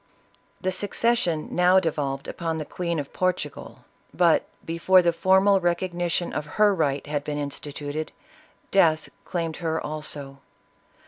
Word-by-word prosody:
The 185 - -1
succession 200 -3 0
now 180 +1 +5
devolved 145 -5 -2
upon 165 -1 -3
the 155 - -4
Queen 170 0 -3
of 145 -2 -5
Portugal, 180 -5 -3 0.3
but - - +3 0.2
before 180 +3 +4
the 170 0 +3
formal 190 +3 +4
recognition 175 0 -1
of 150 - -3
her 210 -1 +5
right 145 -6 0
had 145 -1 -2
been 145 0 -3
instituted, 145 +1 -5 0.6
death 160 -5 +3 0.2
claimed 165 -3 -3
her 160 -2 -1
also. 145 -2 -4
165 Hz, 130 wpm, -25 LUFS, 150-185 Hz, 0.6 s, now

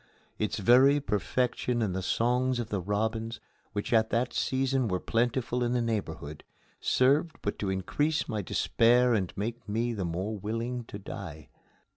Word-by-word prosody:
Its 105 - -1
very 130 +7 +6
perfection 125 - -1
and 95 -4 -1
the 95 - -1
songs 125 +6 +1
of 115 -2 -3
the 100 -4 -1
robins, 110 +4 -2 0.3
which 105 +3 -2
at 110 -1 +4
that 120 +1 0
season 130 -1 +1
were 90 -3 0
plentiful 120 +2 0
in 120 0 0
the 125 - +2
neighborhood, 80 -10 -3 0.4
served 145 +6 +2
but 105 - -2
to 100 - -1
increase 145 - 0
my 110 -3 -2
despair 120 +5 +3
and 95 -5 0
make 115 +2 -4
me 115 +3 0
the 100 -4 -3
more 90 +6 -2
willing 115 +4 -3
to 100 - -8
die. 85 -6 -8
115 Hz, 160 wpm, -29 LUFS, 100-125 Hz, 0.4 s, very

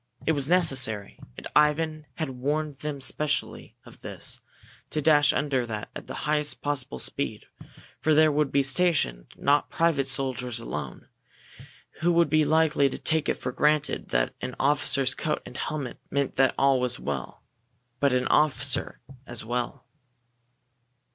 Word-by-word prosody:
It - - +3
was 140 -2 -1
necessary, 130 - +2 0.2
and - - -9
Ivan 150 +1 +2
had 155 -5 -3
warned 145 +3 -2
them 145 -2 -5
specially 150 +2 -1
of - - -16
this, - - -2 0.5
to 155 - -2
dash 150 -1 +5
under 140 -3 0
that 105 -2 -5
at - - -8
the - - -6
highest 150 -1 0
possible 140 - -2
speed - - -2 0.5
for 155 -1 +2
there 155 0 +5
would 150 -1 0
be 140 0 +3
stationed 135 - +1
not 145 +1 +2
private 160 -5 +1
soldiers 130 -3 -1
alone, 115 - -6 0.9
who 175 +2 +2
would 170 0 +3
be 155 -1 +4
likely 155 -2 +3
to - - -5
take 160 -1 0
it - - +1
for 125 - -5
granted 150 +2 +1
that - - 0
an 125 - -5
officer's 135 -1 +2
coat 150 +2 -2
and 125 - -9
helmet 145 -5 -4
meant 140 -1 -1
that 135 -1 +3
all 135 -1 +3
was 125 -1 0
well, 70 -3 -5 0.6
but 140 0 +3
an 125 0 +1
officer 135 -4 +1 0.3
as 120 -2 -2
well. 120 +1 -3
140 Hz, 155 wpm, -26 LUFS, 125-150 Hz, 0.9 s, dash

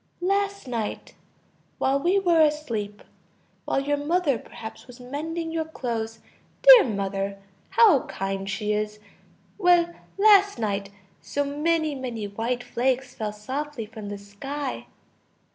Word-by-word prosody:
Last 400 -1 0
night... 230 -4 -4 0.6
while 270 +1 +2
we 355 +7 +2
were 345 -4 +4
asleep, 235 -10 0 0.6
while - - +1
your 290 +1 0
mother 295 -3 +1
perhaps 220 +3 -10
was 250 0 -13
mending 320 +6 -4
your 325 -1 -1
clothes... 230 -7 -4 0.5
dear - - +10
mother, 200 -2 -2 0.3
how 395 - +5
kind 195 0 -3
she 210 +2 -1
is!... 210 0 -2 0.6
well, 350 -2 +4 0.2
last 405 -2 +6
night, 200 -3 -2 0.3
so 285 - -2
many, 310 +2 0
many 245 -5 -4
white 230 +4 -2
flakes 260 +2 -1
fell 215 -1 -3
softly 260 +4 -5
from 215 -1 -9
the 205 - -5
sky!... 260 +8 -6
265 Hz, 125 wpm, -25 LUFS, 215-325 Hz, 0.6 s, dear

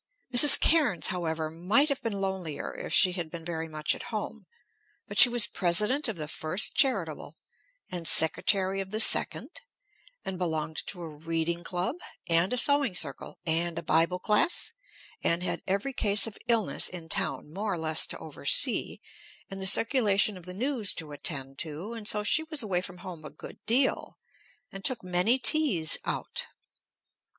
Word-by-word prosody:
Mrs. 280 +4 +11
Cairnes, 300 - +2
however, 160 -3 -4
might 200 - +1
have 280 - -4
been 210 -3 -5
lonelier 190 -5 -5
if - - -9
she 185 - +4
had 175 -3 -6
been 165 0 -10
very 165 -1 -5
much 155 -1 -2
at - - -10
home; - - -7 0.6
but - - -2
she 245 - +9
was 240 -3 +4
President 210 - +1
of 225 - -5
the 155 -3 -7
First 160 +6 -2
Charitable, 270 -2 -1 0.6
and 175 -3 -4
Secretary 190 +4 +2
of 190 - -9
the 215 +2 -5
Second, - - +5 0.6
and 190 -1 -6
belonged 160 -3 -4
to 180 -3 -5
a - - -7
reading 165 +2 -5
club, 180 - -4 0.3
and 170 +2 +1
a 250 - -2
sewing 280 -5 +2
circle, 140 -6 -3
and 170 +1 -1
a 170 - -6
bible 165 +3 +1
class, 210 - 0 0.5
and 170 +1 0
had - - -4
every 200 +8 -3
case 205 -4 +2
of 225 -3 -9
illness 230 -4 +1
in 170 -3 -9
town 150 -1 -2
more 205 +3 -4
or 180 - -3
less 160 -1 +1
to - - -6
oversee, - - 0 0.5
and 195 0 -8
the 190 - +2
circulation 215 -3 +1
of 180 -1 -13
the 180 - -8
news 235 -4 -1
to 155 -2 -6
attend 135 -2 -4
to, 165 +7 -6
and 225 -3 -8
so 210 -1 +1
she 300 - +1
was 315 -4 -4
away 185 -4 -2
from 180 -1 -9
home 175 -4 -10
a 150 - -9
good 150 - -14
deal, 255 +4 0 0.5
and 195 0 -10
took 250 -5 -1
many 180 +7 +1
teas 260 - +2
out. - - -5
185 Hz, 175 wpm, -26 LUFS, 165-220 Hz, 0.6 s, Mrs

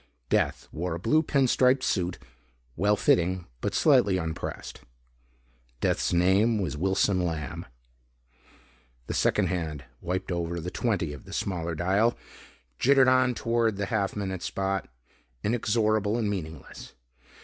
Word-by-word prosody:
Death - - 0
wore 85 +1 -3
a - - -5
blue 155 - +3
pin 140 -4 +2
stripe 130 +1 +3
suit, 90 -2 0 0.6
well 105 +2 +2
fitting 90 -2 +2 0.2
but - - -2
slightly 95 -2 +4
unpressed. 80 -3 -5 1.0
Death's - - 0
name 95 +6 +3
was 95 -7 -2
Wilson 95 +2 +1
Lamb. 80 -7 -4 1.4
The - - -4
second - - +2
hand 80 -5 -3 0.2
wiped 90 +2 -3
over 85 0 -2
the 90 +2 -5
"20" 100 -10 -1
of 70 - -11
the - - -10
smaller 85 -3 -2
dial, 100 +8 +2 0.6
jittered 135 0 +5
on 130 -1 +3
toward 115 -3 0
the 100 - -1
half 100 -3 0
minute 95 -3 -3
spot. 95 0 -2 0.6
Inexorable 110 -1 +1
and 115 -3 0
meaningless. 80 -7 -7
95 Hz, 130 wpm, -27 LUFS, 85-110 Hz, 1.4 s, jittered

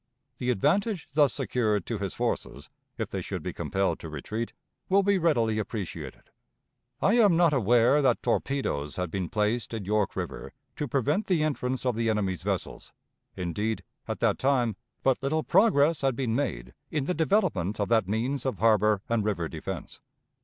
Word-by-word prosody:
The 125 - -1
advantage 195 - +1
thus 145 -1 +4
secured 110 - 0
to 115 -4 -3
his 100 -2 -4
forces, - - -3 0.3
if - - -3
they - - -2
should - - -5
be - - -4
compelled 95 0 -1
to 80 - -7
retreat, 105 +10 -4 0.4
will 195 +1 +4
be 200 -1 +3
readily 115 -10 +2
appreciated. 90 - -6 0.7
I 215 +5 +4
am 200 -7 +5
not 170 -3 +4
aware 120 +3 +4
that 130 -4 +2
torpedoes 75 - -1
had 90 -3 -3
been 95 -2 -2
placed 110 +2 0
in 105 -4 -5
York 105 0 0
River - - -5 0.2
to 150 - -2
prevent 140 - 0
the 175 -5 +2
entrance 130 -4 -2
of 125 -3 +1
the 115 0 0
enemy's 100 -5 0
vessels; - - -4 0.4
indeed, 105 +5 -2 0.2
at - - -4
that - - +2
time, 125 -5 +2 0.3
but 135 -2 +2
little 155 +3 0
progress 165 -6 +4
had 135 -2 +1
been 120 -3 -1
made 65 - -2 0.2
in 150 -3 -1
the 180 - 0
development 160 - +1
of 100 - +1
that 110 -5 +3
means 120 +6 -1
of 130 - -2
harbor 105 -2 +3
and 115 -2 +1
river 95 -6 -1
defense. 85 +2 -7
115 Hz, 175 wpm, -27 LUFS, 105-145 Hz, 0.7 s, am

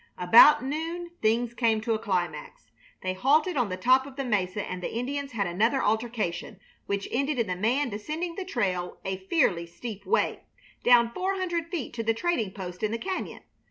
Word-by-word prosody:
About 230 +9 +7
noon 330 +5 -4
things 230 +2 +1
came 230 -2 +2
to 225 +1 0
a 220 - -1
climax. 175 - -3 0.3
They 185 0 -1
halted 300 - +2
on 245 -6 +1
the 185 - -3
top 260 +7 +4
of 275 - -11
the 275 -1 -3
mesa, 200 -3 -1
and 185 0 -5
the - - -4
Indians 275 +3 -3
had 205 -3 0
another 215 +10 +1
altercation, 215 -3 -2 0.3
which 200 0 -2
ended 275 +3 0
in 235 - +1
the 180 -2 -2
man 245 +9 +1
descending 305 +12 -4
the 385 - -5
trail 185 - -2
a 190 0 -2
fearfully 175 - +2
steep 205 +3 -8
way, - - +1 0.4
down 235 -1 +5
four 380 +6 -1
hundred 345 -3 -2
feet 335 -8 -4
to 230 -1 -3
the 225 0 +1
trading 340 - 0
post 180 -2 -8
in 215 - +1
the 230 - -1
cañon. 375 +8 -4
230 Hz, 195 wpm, -27 LUFS, 195-280 Hz, 0.4 s, About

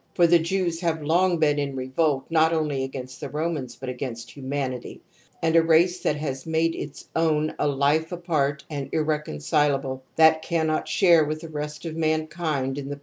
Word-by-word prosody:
For 175 - +5
_ - - -4
the 175 - +7
Jews 170 0 -1
have 165 -3 -1
long 175 +3 +2
been 150 -2 +2
in 140 -1 -2
revolt 135 +1 0
not 160 0 +4
only 150 -4 0
against 130 -1 -7
_the - - -5
Romans, 150 -5 -3
but 130 - -8
against 120 -2 -5
humanity; 135 -2 -4 0.4
and 165 0 +2
a 165 - +7
race 170 +3 +3
that 150 - 0
has 135 -2 -4
made 160 +1 +1
its 145 - -7
own 155 -2 +1
a - - +2
life 145 +4 +1
apart 155 -5 -1
and 145 -3 -5
irreconcilable, 145 - 0
that 160 0 +5
cannot 160 -2 0
share 170 -5 +5
with 155 +1 -3
the 165 - -8
rest 150 +1 -6
of 160 -1 -4
mankind 155 -3 -1
in 140 0 -6
the. 145 0 -6
155 Hz, 185 wpm, -25 LUFS, 140-165 Hz, 0.4 s, the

